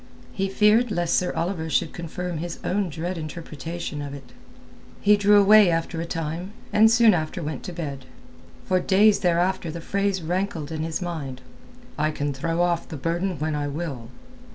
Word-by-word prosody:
He 195 -1 -1
feared 215 +4 +4
lest 175 -4 0
Sir 180 - +2
Oliver 165 -2 -2
should 160 +1 0
confirm 175 0 -5
his 170 +1 -5
own 195 0 0
dread 170 +3 -4
interpretation 160 0 -6
of 145 -1 -6
it. 135 -3 -12 0.7
He 210 0 +5
drew 205 0 +5
away 205 -1 +7
after 165 0 -1
a 170 - -4
time, 165 +4 -4 0.2
and 220 +1 +6
soon 230 -1 +6
after 160 +1 -2
went 150 -2 -4
to - - -5
bed. 145 -6 -6 0.6
For 185 - +2
days 205 +3 +4
thereafter 175 0 +1
the 165 +2 -5
phrase 195 +1 -1
rankled 175 -2 -2
in 155 -1 -3
his 165 +3 -3
mind—"I 155 - -6
can 145 -2 -2
throw 165 +5 0
off 170 -1 0
the 160 - -6
burden 175 +5 -1
when 155 +2 -2
I 145 -1 -1
will." 140 -6 -5
170 Hz, 175 wpm, -24 LUFS, 155-190 Hz, 0.7 s, away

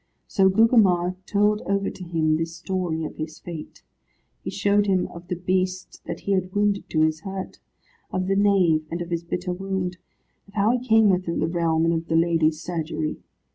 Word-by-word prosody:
So 190 -2 +3
Gugemar 190 -4 +4
told 210 +1 +2
over 200 0 0
to 185 - -10
him 160 -3 +1
this 165 +1 -3
story 175 -2 -2
of - - -8
his 155 0 -5
fate. 165 -3 -9 0.6
He - - -4
showed 205 0 +2
him 185 -2 +2
of 170 +1 -11
the 180 - -2
Beast 185 +1 -2
that 170 0 -5
he 200 - -3
had 185 -1 0
wounded 205 -1 +1
to 155 - +1
his 155 0 +2
hurt; 190 +2 -6 0.5
of 185 0 -1
the 195 +1 +1
nave, 190 -6 +3
and 170 - -3
of 170 - -11
his 170 0 -1
bitter 180 +1 -3
wound; 185 -1 -3 0.5
of 200 - -19
how 210 +2 +3
he - - -1
came 220 -3 +6
within 180 -2 -1
the - - +2
realm, 165 -1 +1
and 165 - +2
of 165 0 -2
the 165 - 0
lady's 165 -2 +2
surgery. 160 -2 -3
180 Hz, 195 wpm, -24 LUFS, 165-195 Hz, 0.6 s, came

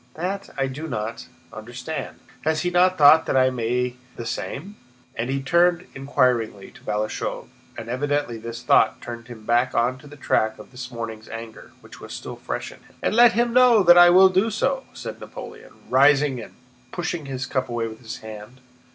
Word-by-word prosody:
That 190 +4 -4
I 135 - +1
do 135 +5 -6
not... 115 -4 -5 0.3
understand. 120 +7 -7 0.2
Has 155 -1 +1
he 180 - 0
not 185 +1 +3
thought 155 +2 +7
that - - +1
I 130 0 +4
may 125 +1 -1
do 125 - -18 0.2
the 120 - -7
same?" 165 - -5 0.4
and 115 +2 -3
he 135 0 -2
turned 175 +4 +3
inquiringly 125 -7 0
to - - -17
Balashëv, 105 +1 -3 0.3
and 115 - -7
evidently 145 -1 -2
this 115 +1 -7
thought 120 -4 +3
turned 120 -1 -8
him 115 -3 -11
back 120 +2 +1
on 125 +2 +1
to 145 - -15
the 145 - -12
track 110 -5 0
of - - -13
his 125 -1 -8
morning's 115 -2 -7
anger, 115 -1 -9
which - - -14
was - - -9
still - - -7
fresh - - -5
in - - -15
him. - - -24
"And - - +1
let 235 0 +6
him 235 0 +1
know 245 -4 +6
that 175 -1 +8
I 175 0 +8
will 190 +2 +7
do 190 +4 +2
so!" 265 +5 -1
said - - -7
Napoleon, - - -10
rising 140 -1 +4
and - - -12 0.4
pushing 160 -5 -4
his 130 -1 -4
cup 130 -1 -2
away 120 -1 -2
with 110 0 -10
his 115 -3 -8
hand. 110 +3 -10
130 Hz, 195 wpm, -23 LUFS, 115-170 Hz, 0.4 s, that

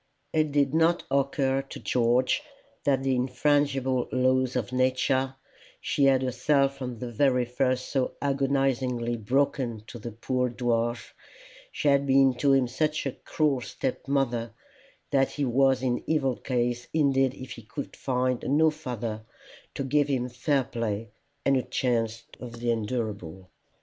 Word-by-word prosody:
It 155 -1 +2
did 140 -1 +2
not 165 +2 +3
occur 135 -1 +1
to 135 - -10
George 125 - +2 0.4
that 135 -2 +2
the 135 -1 +1
infrangible 130 0 +1
laws 130 0 +2
of 125 -1 -2
Nature 130 +1 +1 0.4
she 140 - +1
had 135 -1 +4
herself 135 +2 +2
from 125 -2 -5
the 120 +1 -6
very 125 +1 +2
first 130 +1 -1
so 135 -2 -1
agonizingly 135 -3 0
broken 120 -1 0
to 120 - -9
the 115 +2 -6
poor 125 +3 -1
dwarf, 120 -1 -1 0.6
she 150 - -2
had 140 0 +3
been 135 -1 +5
to 140 +2 +3
him 135 -2 +3
such 150 +5 -1
a 135 - 0
cruel 145 -1 -1
step 130 +2 -4
mother, 120 -4 0 0.6
that 135 -1 +2
he 145 - -1
was 130 +1 +3
in 125 -2 0
evil 135 -5 +1
case 120 -1 -2
indeed 135 -3 +3
if 130 -2 -9
he 115 - -8
could 125 +6 -7
find 125 -1 -1
no 155 +3 +3
father 120 -7 -5 0.5
to - - -2
give 145 +2 +2
him 125 -3 -1
fair 135 +3 +1
play 115 -4 -4 0.3
and 135 -1 +4
a - - +1
chance 115 -2 -1 0.2
of 120 -2 -8
the 120 0 0
endurable. 105 -6 -4
130 Hz, 150 wpm, -27 LUFS, 120-135 Hz, 0.6 s, been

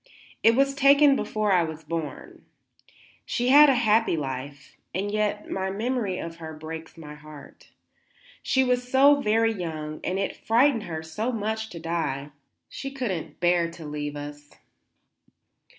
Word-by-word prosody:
"It 230 0 +5
was 275 +1 +3
taken 280 +1 +5
before 215 -5 -1
I 180 -2 +4
was 160 -1 -5
born. 160 -1 -6 0.8
She 245 0 -1
had 290 +2 +8
a 270 - +4
happy 225 -6 +2
life, 140 0 -6 0.2
and 200 +2 -2
yet 210 0 -1
my 190 0 -2
memory 215 -1 -2
of 165 -1 -6
her 160 -1 -8
breaks 160 +1 -8
my 150 -2 -9
heart. 150 -1 -14 0.7
She 265 - +2
was 250 -1 0
so 280 +2 +6
very 225 0 +2
young 155 -5 -5
and 185 - -1
it 195 - -2
frightened 235 0 +2
her 160 -2 -5
so 210 +10 -3
much 220 -1 -3
to 170 - -8
die; 160 -4 -3 0.4
she 275 - -6
could 260 -6 -3
not 160 -4 -6
bear 175 -1 +2
to 165 -1 -11
leave 150 0 -5
us." 145 0 -9
185 Hz, 155 wpm, -25 LUFS, 160-235 Hz, 0.8 s, had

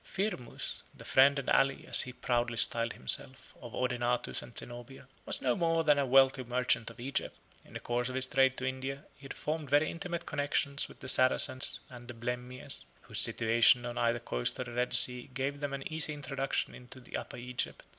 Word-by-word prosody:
Firmus, 190 - -4 0.2
the - - -12
friend 140 +2 +5
and 140 - -4
ally, 135 0 +2
as - - +6
he 125 - -5
proudly 120 -2 -1
styled 115 0 +4
himself, 130 -2 -3
of 120 -1 -9
Odenathus 125 -1 -1
and 120 - -13
Zenobia, 120 +2 -8 0.2
was - - -1
no 125 -2 +2
more 165 -1 +1
than 150 -2 +3
a 140 - 0
wealthy 135 0 +4
merchant 125 -2 0
of 115 0 -15
Egypt. 135 +3 -3 0.3
In - - -18
the - - -4
course 120 +1 -2
of 130 - -6
his 130 0 +3
trade 135 0 +2
to 130 - -3
India, 130 +2 -4
he 140 - -16
had - - -7
formed 155 -2 -4
very 145 +3 +3
intimate 170 0 -5
connections 145 -1 -1
with - - -16
the 130 - -8
Saracens 130 0 +4
and 120 -1 -12
the 120 - -8
Blemmyes, 125 +3 -4 0.2
whose - - -1
situation 115 +2 +4
on 120 0 -5
either 120 0 +1
coast - - -2
of 125 - -4
the 120 - -9
Red 125 +1 -1
Sea 125 +1 +4
gave 140 +2 -2
them 145 -1 -4
an 140 -1 -5
easy 155 -1 0
introduction 140 -1 -3
into 125 +1 -11
the 125 - -10
Upper - - -6
Egypt. 125 +1 -4
130 Hz, 205 wpm, -31 LUFS, 120-140 Hz, 0.3 s, as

